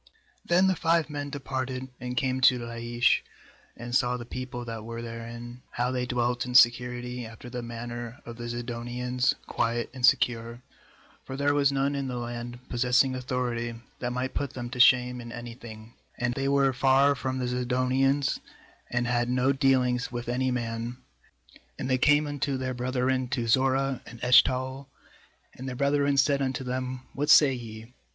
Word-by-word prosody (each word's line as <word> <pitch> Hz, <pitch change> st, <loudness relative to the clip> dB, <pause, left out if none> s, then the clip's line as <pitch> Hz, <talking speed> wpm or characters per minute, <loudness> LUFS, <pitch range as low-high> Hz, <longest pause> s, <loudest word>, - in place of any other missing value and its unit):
7Then 180 Hz, +2 st, +5 dB
the 190 Hz, -, +2 dB
five 165 Hz, -2 st, +1 dB
men 145 Hz, -1 st, -4 dB
departed^ 130 Hz, -2 st, -4 dB
and 125 Hz, 0 st, -5 dB
came 130 Hz, -2 st, 0 dB
to 125 Hz, 0 st, +6 dB
Laish, 120 Hz, 0 st, +1 dB, 0.6 s
and 120 Hz, +1 st, -7 dB
saw 125 Hz, -1 st, +2 dB
the 120 Hz, -, -7 dB
people 125 Hz, 0 st, -6 dB
that 115 Hz, -2 st, -6 dB
were 115 Hz, +1 st, -6 dB
therein, 120 Hz, +1 st, -8 dB
how 125 Hz, +1 st, -1 dB
they 125 Hz, -1 st, -2 dB
dwelt 125 Hz, 0 st, 0 dB
in 125 Hz, 0 st, -5 dB
security, 125 Hz, 0 st, +3 dB
after 115 Hz, +2 st, -10 dB
the 125 Hz, -1 st, -4 dB
manner 120 Hz, +1 st, -6 dB
of 115 Hz, -1 st, -8 dB
the 120 Hz, 0 st, -6 dB
Zidonians, 120 Hz, +1 st, -1 dB
quiet 115 Hz, 0 st, -1 dB
and 130 Hz, -2 st, -9 dB
secure; 115 Hz, 0 st, +2 dB, 0.6 s
for 135 Hz, -, -7 dB
there 145 Hz, +1 st, +2 dB
was 140 Hz, -1 st, +3 dB
none 140 Hz, +1 st, +1 dB
in 140 Hz, -1 st, -2 dB
the 125 Hz, -1 st, -4 dB
land, 120 Hz, +1 st, -6 dB
possessing 125 Hz, +2 st, +2 dB
authority, 125 Hz, -2 st, -2 dB, 0.2 s
that 120 Hz, -, -2 dB
might 125 Hz, +1 st, -3 dB
put 140 Hz, -, -3 dB
them 120 Hz, -1 st, -6 dB
to 125 Hz, -, -6 dB
shame 125 Hz, 0 st, +5 dB
in 120 Hz, 0 st, -9 dB
any 120 Hz, 0 st, -7 dB
thing, 110 Hz, -1 st, -11 dB, 0.2 s
and 120 Hz, 0 st, 0 dB
they 135 Hz, +2 st, -2 dB
were 140 Hz, -1 st, +3 dB
far 135 Hz, +2 st, +4 dB
from 130 Hz, -1 st, -3 dB
the 130 Hz, -, -1 dB
Zidonians, 130 Hz, +2 st, +1 dB, 0.5 s
and 120 Hz, 0 st, 0 dB
had 120 Hz, 0 st, 0 dB
no 130 Hz, +2 st, +2 dB
dealings 130 Hz, -2 st, +2 dB
with 120 Hz, -1 st, -5 dB
any 130 Hz, +2 st, 0 dB
man. 120 Hz, 0 st, -3 dB, 0.8 s
8And -, -, -3 dB
they 130 Hz, -1 st, +2 dB
came 150 Hz, +2 st, +4 dB
unto 145 Hz, -2 st, -2 dB
their 130 Hz, 0 st, -3 dB
brethren 130 Hz, +1 st, 0 dB
to 120 Hz, -2 st, -2 dB
Zorah 135 Hz, +2 st, +2 dB
and 120 Hz, -, -11 dB
Eshtaol; 130 Hz, +2 st, +3 dB, 0.7 s
and 130 Hz, +1 st, -7 dB
their 125 Hz, -, -5 dB
brethren 140 Hz, +1 st, +2 dB
said 140 Hz, +1 st, +3 dB
unto 135 Hz, 0 st, -1 dB
them: 130 Hz, 0 st, -4 dB
'What 145 Hz, +2 st, -2 dB
say 145 Hz, -3 st, +7 dB
ye?' 115 Hz, -1 st, -9 dB
125 Hz, 175 wpm, -27 LUFS, 120-130 Hz, 0.8 s, say